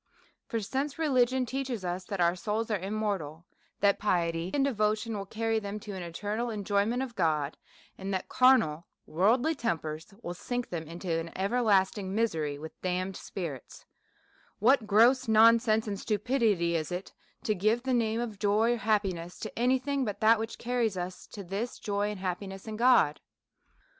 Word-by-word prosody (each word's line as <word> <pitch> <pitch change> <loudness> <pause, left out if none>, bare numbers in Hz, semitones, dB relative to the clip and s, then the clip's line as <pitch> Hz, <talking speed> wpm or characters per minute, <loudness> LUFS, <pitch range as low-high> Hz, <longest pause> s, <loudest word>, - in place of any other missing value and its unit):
For, 230 - -2
since 270 +7 -3
religion 260 -4 +2
teaches 255 -5 -3
us 180 +1 -3
that 200 0 -4
our 170 0 +3
souls 215 +5 -2
are 210 - +1
im 195 +4 -4
mortal, 175 -7 -3 0.4
that 200 0 +4
piety 170 -4 0
and 275 -1 +2
devotion 215 -3 0
will 195 -1 -5
carry 225 +1 0
them 205 0 -5
to 210 -1 -7
an 190 -2 -5
eternal 205 +7 -3
enjoyment 210 +3 0
of 245 -3 -7
God, 155 -4 0 0.4
and 195 +1 -4
that 190 -1 -2
carnal 225 -12 +3 0.2
worldly 230 - +2
tempers 160 - -3
will 175 - -4
sink 245 +7 -4
them 165 -3 -4
into 170 +2 -5
an 165 0 -1
everlasting* 195 -2 +1
misery 160 -10 0
with 155 +2 -10
damned 185 +1 -2
spirits, 160 -11 -7 0.7
what 235 0 +3
gross 240 +5 +5
nonsense 225 0 +5
and 200 -2 -3
stupidity 210 -6 +1
is 155 0 -2
it 180 +2 -5 0.3
to 220 -5 +1
give 215 +5 +1
the 260 -1 0
name 225 -2 +1
of 225 -4 -4
joy 215 +3 +3
or - - -2
happiness 195 -6 -1
to - - -6
any 250 +2 +4
thing 275 +1 -1
but 210 -5 -3
that 220 +1 +5
which 225 +1 -4
carries 235 -5 -1
us 180 +1 -5
to 200 - -8
this 200 +7 -4
joy 205 0 -1
and 210 -2 -5
happiness 190 +2 -4
in 220 - -4
God? 230 -11 +4
210 Hz, 175 wpm, -29 LUFS, 180-235 Hz, 0.7 s, gross